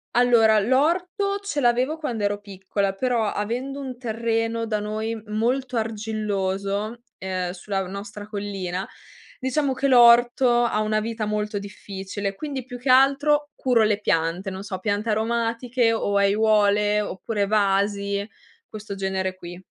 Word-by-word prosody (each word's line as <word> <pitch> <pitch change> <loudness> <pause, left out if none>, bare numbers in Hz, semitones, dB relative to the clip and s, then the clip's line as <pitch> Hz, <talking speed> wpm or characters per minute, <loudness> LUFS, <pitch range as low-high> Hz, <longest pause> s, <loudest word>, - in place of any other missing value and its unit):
Allora, 230 -3 +5
l'orto 355 - +1
ce 300 -8 -2
l'avevo 250 +5 +2
quando 240 -9 -3
ero 205 0 0
piccola, 195 0 -3
però, 240 +1 0
avendo 250 +7 -3
un 255 -2 -7
terreno 230 -1 -1
da 215 -1 -1
noi 215 +1 -3
molto 245 +4 -1
argilloso, 210 -1 -2 0.2
ehm, 185 -1 -3
sulla 195 +1 -3
nostra 205 +2 -7
collina, 195 -3 -4 0.5
diciamo 265 +1 0
che 275 +2 0
l'orto 240 0 +6
ha 225 -3 +1
una 215 0 +1
vita 225 -1 -3
molto 210 0 -2
difficile, 200 0 -6
quindi, 275 +3 -5
più 245 0 -9
che 255 - -3
altro, 280 +3 +4
curo, 245 -4 +2
le 210 -1 +2
piante, 175 +1 0
non 190 +1 -6
so: 190 -3 -5
piante 205 +2 -1
aromatiche, 230 +2 0
o 205 -2 -1
aiuole 210 0 +3
oppure 205 +1 -2
vasi, 200 0 +1 0.4
questo 210 -2 -7
genere 190 -1 -2
qui. 175 0 -10
215 Hz, 135 wpm, -24 LUFS, 200-240 Hz, 0.5 s, l'orto